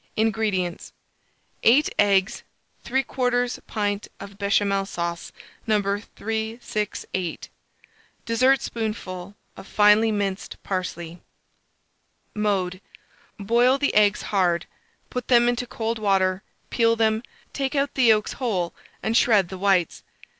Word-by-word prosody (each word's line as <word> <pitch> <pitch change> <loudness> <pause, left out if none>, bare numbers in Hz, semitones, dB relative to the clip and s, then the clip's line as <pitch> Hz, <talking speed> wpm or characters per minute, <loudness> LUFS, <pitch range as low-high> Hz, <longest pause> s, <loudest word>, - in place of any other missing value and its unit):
INGREDIENTS. 215 -5 -1 0.7
8 265 +7 +5
eggs, 195 -1 +3 0.4
3/4 245 -1 0
pint 205 -1 -2
of 200 0 -11
Béchamel 200 -1 +1
sauce 170 -2 -4 0.4
No. 215 -1 +3
368, 210 -2 -4 0.8
dessertspoonful 220 -6 -1 0.2
of - - -11
finely 210 +2 +4
minced 200 -2 -3
parsley. 175 -3 -4 1.1
Mode. 195 -3 -1 0.6
Boil 240 +6 +3
the 285 0 0
eggs 210 0 +3
hard; 180 -4 +1 0.5
put 250 -1 -4
them 240 -1 +5
into 245 0 0
cold 225 0 -3
water, 190 -2 +1 0.3
peel 230 -1 +3
them, 220 -1 +1 0.3
take 270 +1 -2
out 280 0 0
the 260 - +2
yolks 215 -2 +3
whole, 195 -10 -2 0.3
and 220 - 0
shred 210 -7 +4
the 190 - -7
whites. 190 -4 +1
210 Hz, 105 wpm, -24 LUFS, 195-230 Hz, 1.1 s, 8